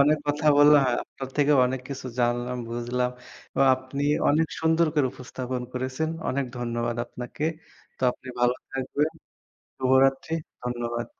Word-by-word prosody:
অনেক 150 +2 +5
কথা 150 +1 0
বললাম। 145 0 +8
হ্যাঁ, 125 - +1
আপনার 135 -1 -8
থেকে 145 0 +4
অনেক 130 +1 -2
কিছু 135 -2 -6
জানলাম, 120 +1 0
বুঝলাম। 125 +1 -1 0.4
এবং 135 - +4
আপনি 130 +2 -5 0.3
অনেক 160 +2 +3
সুন্দর 160 +1 +3
করে 145 -4 +3
উপস্থাপন 125 0 -5
করেছেন। 130 +5 -2 0.2
অনেক 140 +1 0
ধন্যবাদ 120 -1 -2
আপনাকে। 125 +5 -6 0.5
তো - - -11
আপনি 130 - -14
ভালো 125 0 +4 0.2
থাকবেন। 145 +4 -1 0.7
শুভরাত্রি। 135 +3 +3 0.3
ধন্যবাদ। 120 -1 -3
130 Hz, 140 wpm, -26 LUFS, 125-145 Hz, 0.7 s, বললাম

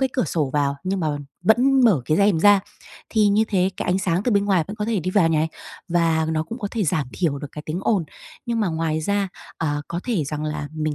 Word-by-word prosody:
cái 265 - +2
cửa 255 - +1
sổ 150 -3 -1
vào 140 -1 +1
nhưng 190 +1 -1
mà 160 - 0 0.4
vẫn 255 +4 +4
mở 185 - +4
cái 155 - +1
rèm 200 -4 +3
ra 205 +1 +6 0.5
thì 215 -2 +3
như 210 +2 +3
thế 190 -2 +2
cái - - -4
ánh 180 +1 +2
sáng 185 0 0
từ 245 - +1
bên 200 -1 +3
ngoài 190 -5 +2
vẫn 205 - -7
có 210 - -2
thể 220 -3 0
đi 185 +3 -2
vào 185 -4 +3
nh - - 0
này, 155 +1 +1 0.4
và 165 -2 +2
nó 155 0 0
cũng 225 +10 -7
có 205 -4 -3
thể 220 -5 -1
giảm 155 -5 0
thiểu 155 -6 -1
được 145 - -7
cái 150 - -7
tiếng 155 +3 -2
ồn. 195 -6 +1 0.4
Nhưng 235 -1 -1
mà 205 - +1
ngoài 160 -1 -1
ra, 200 +4 0 0.3
à, 145 -2 -1
có 170 - -3
thể 210 - 0
rằng 150 +2 -4
là 150 -1 -3
mình 155 -1 -2
180 Hz, 265 wpm, -22 LUFS, 155-205 Hz, 0.5 s, ra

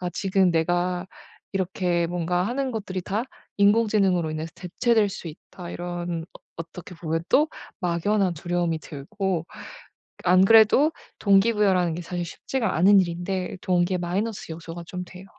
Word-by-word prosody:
아 180 -1 -3
지금 190 -1 +2
내가 175 +2 0 0.5
이렇게 180 -2 0
뭔가 175 +1 0
하는 260 +5 -1
것들이 195 -4 -4
다 205 +5 -1 0.4
인공지능으로 200 -5 +3
인해서 155 +1 -4
대체될 210 +5 +1
수 180 -3 -7
있다 175 +3 -10
이런 175 -1 -4 0.2
어 - - -50
어떻게 165 +2 -9
보면 165 -1 -2
또 300 +2 +4 0.3
막연한 185 +2 +1
두려움이 175 0 -1
들고 170 +4 -3
ㄱ - - -12 0.6
안 185 +1 +6
그래도 225 +8 +6 0.3
동기부여라는 195 -4 +3
게 175 - -5
사실 175 +1 -4
쉽지가 225 +5 -2
않은 195 +4 +6
일인데 180 +2 -3
동기의 180 0 +1
마이너스 195 +3 -3
요소가 165 +1 -8
좀 180 0 -5
돼요. 185 +1 -12
180 Hz, 330 characters per minute, -25 LUFS, 170-200 Hz, 0.6 s, 안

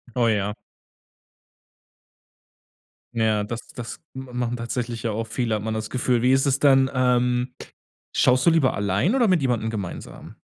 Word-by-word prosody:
Oh, 120 -2 +3
ja. 105 -2 0 2.6
Ja 110 -2 +2
das 115 +2 -6
das 125 -7 -8
m 130 0 -7
machen 120 0 -2
tatsächlich 115 -1 -4
ja 115 - 0
auch 115 +2 -3
viele, 115 -1 -1
hat 105 - -3
man 110 +1 -3
das 110 0 -4
Gefühl. 125 -1 +1
Wie 125 - +4
ist 135 +1 +3
es 135 -1 +2
denn, 135 -2 +5
ähm, 125 0 +1 0.6
schaust 125 0 +3
du - - +7
lieber 160 -5 +3
allein 100 - +1
oder 245 -4 +3
mit 185 -5 +3
jemandem 120 -4 0
gemeinsam? 100 -6 -7
120 Hz, 160 wpm, -24 LUFS, 110-130 Hz, 2.6 s, du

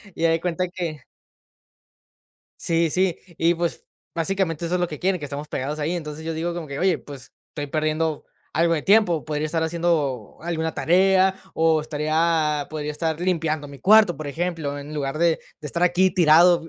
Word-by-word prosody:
Y 165 - 0
haz 165 - +4
de 165 - +1
cuenta 180 +1 -1
que 165 -6 -5 1.6
Sí, 165 -1 +1
sí. 185 -1 +1 0.2
Y, 170 +1 +3
pues, 170 0 -3 0.3
básicamente 170 -1 -1
eso 175 - -1
es 180 - +1
lo 175 - 0
que 150 - -7
quieren, 185 -2 0
que 145 - -4
estemos 145 +2 -6
pegados 145 +2 -3
ahí. 155 +3 -1
Entonces, 155 -2 -6
yo 165 0 -3
digo 170 +2 -2
como 170 -2 -5
que: 140 -1 -6
"Oye, 185 -3 +2
pues, 135 -2 -12 0.2
estoy 145 -2 -5
perdiendo 155 +1 -1 0.3
algo 165 +1 +2
de 150 - -2
tiempo, 195 -6 +3
podría 155 0 -2
estar 160 +1 -1
haciendo 160 -8 -1
alguna 160 -1 -2
tarea, 190 +2 +3 0.2
o 160 -1 +3
estaría 155 0 0
podría 150 -1 -4
estar 160 +1 -2
limpiando 160 -5 -1
mi 140 - -11
cuarto, 210 - +5
por 155 0 -6
ejemplo, 160 -2 -3
en 145 +1 -8
lugar 145 0 -3
de 170 -1 +3 0.2
de 150 - -6
estar 170 +5 0
aquí 180 +1 +3
tirado, 170 -1 +5
165 Hz, 185 wpm, -23 LUFS, 150-175 Hz, 1.6 s, cuarto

